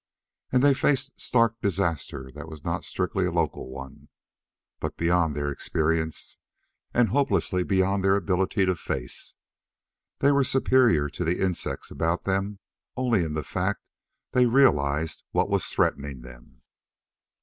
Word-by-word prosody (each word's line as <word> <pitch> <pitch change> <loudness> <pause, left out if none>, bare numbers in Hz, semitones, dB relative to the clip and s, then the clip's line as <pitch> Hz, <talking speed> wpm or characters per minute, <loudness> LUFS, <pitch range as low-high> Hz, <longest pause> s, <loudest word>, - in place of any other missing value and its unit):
And 125 0 +3
they 145 -1 +6
faced 135 +1 0
stark 115 -1 +2
disaster 85 -8 -2
that 75 +3 -9
was 80 -2 -11
not 85 +1 -2
strictly 90 0 -1
a - - -2
local 85 -5 -1
one, 65 0 -10 0.7
but - - -4
beyond 85 -2 +2
their 70 0 -1
experience 80 +2 -2 0.5
and 120 -3 +3
hopelessly 135 -7 +1
beyond 95 +1 +1
their 95 0 +4
ability 95 0 +1
to 95 0 +1
face. 65 -6 -4 0.8
They 140 - +4
were 140 -1 +4
superior 125 - +3
to 75 - -4
the 85 +1 0
insects 90 -4 -2
about 85 +2 -1
them 100 +1 -1 0.4
only 120 -7 +2
in 80 -2 -3
the 75 - -2
fact - - -2 0.5
they 125 -1 +4
realized 80 - +2
what - - +1
was - - +1
threatening 70 -2 -1
them. - - -15
90 Hz, 140 wpm, -26 LUFS, 75-105 Hz, 0.8 s, they